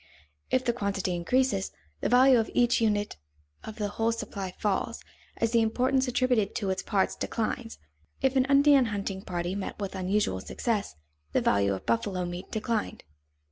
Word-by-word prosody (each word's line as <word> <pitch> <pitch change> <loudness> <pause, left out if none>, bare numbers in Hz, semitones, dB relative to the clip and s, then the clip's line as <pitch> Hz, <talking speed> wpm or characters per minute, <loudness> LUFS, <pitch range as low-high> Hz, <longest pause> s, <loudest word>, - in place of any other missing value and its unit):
If 255 0 +1
the 240 - +2
quantity 200 -5 -2
increases, 195 +3 +1 0.3
the - - -1
value 255 0 +6
of 225 - -1
each 240 -1 +3
unit 210 - 0 0.5
of 220 - -8
the 210 -2 -2
whole 225 +2 0
supply 200 -4 -5
falls, 210 +3 -1 0.3
as 230 - 0
the 230 -1 +4
importance 255 +4 +1
attributed 245 -4 +1
to 200 -5 -1
its 190 - -2
parts 195 -3 0
declines. 225 +1 -3 0.4
If 265 0 +1
an 260 -1 +4
Indian 280 -1 +5
hunting 200 -3 -3
party 175 -1 -3
met 195 -1 -4
with 200 -2 -4
unusual 185 - 0
success, 215 - -2 0.4
the - - +3
value 100 -1 +2
of 95 - -9
buffalo 180 - 0
meat 175 +2 -6
declined. 220 0 -2
215 Hz, 165 wpm, -28 LUFS, 190-245 Hz, 0.5 s, value